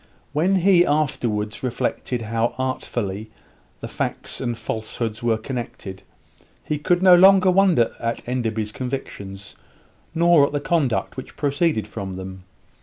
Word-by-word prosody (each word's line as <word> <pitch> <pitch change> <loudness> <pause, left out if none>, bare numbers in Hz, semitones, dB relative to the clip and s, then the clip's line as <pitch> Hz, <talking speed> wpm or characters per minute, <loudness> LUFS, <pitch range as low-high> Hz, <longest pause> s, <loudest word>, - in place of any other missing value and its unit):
When 175 +6 +2
he 185 -1 +5
afterwards 120 -9 -1
reflected 125 -1 -2
how 115 +1 -1
artfully 110 -5 -3 0.5
the - - -5
facts - - -3
and 120 -3 -2
falsehoods 110 0 -4
were 115 -2 +1
connected, 110 -6 -6 0.6
he 150 - -2
could 175 +4 +1
no 185 -1 +8
longer 190 +1 +6
wonder 180 -11 +3
at 115 0 -3
Enderby's 115 -4 -2
convictions, 100 -6 -6 0.6
nor 170 -3 +5
at - - -9
the 145 - 0
conduct 145 -6 0
which 130 - -9
proceeded 145 -5 0
from 100 -3 -6
them. 95 0 -8
125 Hz, 130 wpm, -22 LUFS, 110-155 Hz, 0.6 s, no